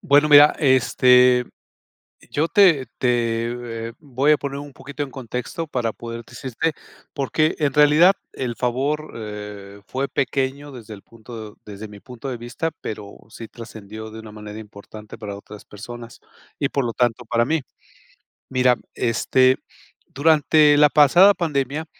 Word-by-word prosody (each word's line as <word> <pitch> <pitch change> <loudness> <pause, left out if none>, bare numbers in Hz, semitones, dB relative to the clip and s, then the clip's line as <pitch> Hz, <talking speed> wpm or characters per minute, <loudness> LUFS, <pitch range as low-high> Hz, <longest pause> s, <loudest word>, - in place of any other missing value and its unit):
Bueno, 145 +1 +4
mira, 145 0 +8
este, 125 -2 +4 0.9
yo 155 +3 0
te 170 -10 +4
te 115 -1 -2
voy 140 0 +1
a - - +5
poner 140 -1 -5
un 145 -1 -9
poquito 140 +3 -7
en 140 - -5
contexto 125 +5 -5
para 120 -6 -2
poderte 115 0 -9
decirte, 135 +5 -3 0.4
porque 155 +3 0
en 145 -3 0
realidad 150 +5 +6 0.2
el 125 -3 -4
favor, 140 +5 -2
eh, 105 -2 -8
fue 135 +1 -3
pequeño 135 +2 -2
desde 115 -4 -11
el 100 - -14
punto 110 -2 -11
desde 105 +1 -9
mi 105 -1 -13
punto 125 +2 -9
de 125 - -4
vista, 120 +7 -4
pero 105 -2 -7
sí 115 0 -10
trascendió 110 -2 -10
de 110 +1 -9
una 110 -1 -12
manera 105 0 -9
importante 105 0 -12
para 105 -3 -7
otras 105 +1 -12
personas 115 +3 -11 0.4
y 140 - 0
por 140 -1 -1
lo 120 - -2
tanto, 120 -1 0
para 120 -1 +1
mí. 160 +1 0 0.9
Mira, 125 -1 +3 0.2
este, 130 +2 +2 0.5
durante 150 +1 +4
la 150 0 +6
pasada 175 +8 +6
pandemia, 150 -2 -2
125 Hz, 145 wpm, -21 LUFS, 115-145 Hz, 0.9 s, mira